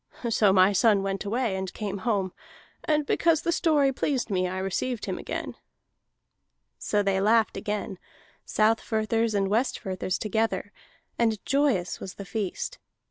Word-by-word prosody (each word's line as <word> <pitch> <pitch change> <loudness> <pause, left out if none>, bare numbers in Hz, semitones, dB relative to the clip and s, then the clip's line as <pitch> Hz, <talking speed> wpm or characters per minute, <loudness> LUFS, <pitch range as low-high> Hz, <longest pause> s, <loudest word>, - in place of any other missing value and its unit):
So 210 -3 +4
my 190 +1 +5
son 200 0 +4
went 195 +1 -3
away, 225 -1 0
and 190 -1 -3
came 200 -2 -4
home, 195 -3 -1 0.5
and 300 -1 +1
because 330 +1 +2
the 340 - +1
story 295 -5 +3
pleased 255 -4 -1
me 185 -1 +1
I 185 +1 -4
received 200 +5 -2
him - - -3
again." - - -5 1.3
So 205 -1 0
they 195 -1 +1
laughed 220 +2 +3
again, 205 -3 -4 0.4
Southfirthers 220 0 +1
and 195 -1 +2
Westfirthers 195 -4 -1
together, 215 -2 -1 0.5
and 225 -2 +2
joyous 270 -11 +1
was 185 - -7
the 200 - -8
feast. 215 - -4
210 Hz, 140 wpm, -27 LUFS, 195-235 Hz, 1.3 s, my